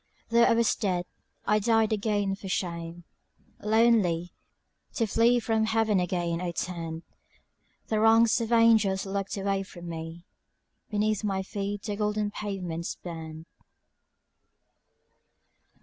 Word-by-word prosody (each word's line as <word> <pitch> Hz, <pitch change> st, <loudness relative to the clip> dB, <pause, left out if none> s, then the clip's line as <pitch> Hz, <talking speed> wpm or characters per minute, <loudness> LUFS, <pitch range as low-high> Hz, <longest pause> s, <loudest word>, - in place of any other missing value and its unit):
Though 235 Hz, 0 st, +5 dB
I -, -, +4 dB
was 230 Hz, -1 st, +3 dB
dead, 180 Hz, -4 st, -1 dB, 0.4 s
I 210 Hz, -, +3 dB
died 225 Hz, 0 st, +2 dB
again 205 Hz, -2 st, 0 dB
for 195 Hz, 0 st, -7 dB
shame; 170 Hz, -2 st, -3 dB, 0.6 s
Lonely, 210 Hz, -6 st, +2 dB, 0.6 s
to 230 Hz, -, +1 dB
flee 230 Hz, +3 st, +3 dB
from 220 Hz, -1 st, +1 dB
heaven 220 Hz, -2 st, +2 dB
again 175 Hz, -1 st, -1 dB
I 175 Hz, -1 st, -3 dB
turned; 165 Hz, -2 st, -4 dB, 0.8 s
The 215 Hz, -, 0 dB
ranks 225 Hz, +1 st, +5 dB
of 230 Hz, 0 st, -3 dB
angels 220 Hz, -5 st, +4 dB
looked 195 Hz, +1 st, -3 dB
away 195 Hz, 0 st, 0 dB
from 175 Hz, -2 st, -10 dB
me 165 Hz, +1 st, -7 dB, 0.6 s
(Beneath 215 Hz, -1 st, 0 dB
my 195 Hz, -2 st, -1 dB
feet 200 Hz, +1 st, -4 dB
the 205 Hz, -, -3 dB
golden 210 Hz, 0 st, -1 dB
pavements 180 Hz, -6 st, -4 dB
burned). 160 Hz, -2 st, -8 dB
200 Hz, 120 wpm, -27 LUFS, 175-220 Hz, 0.8 s, Though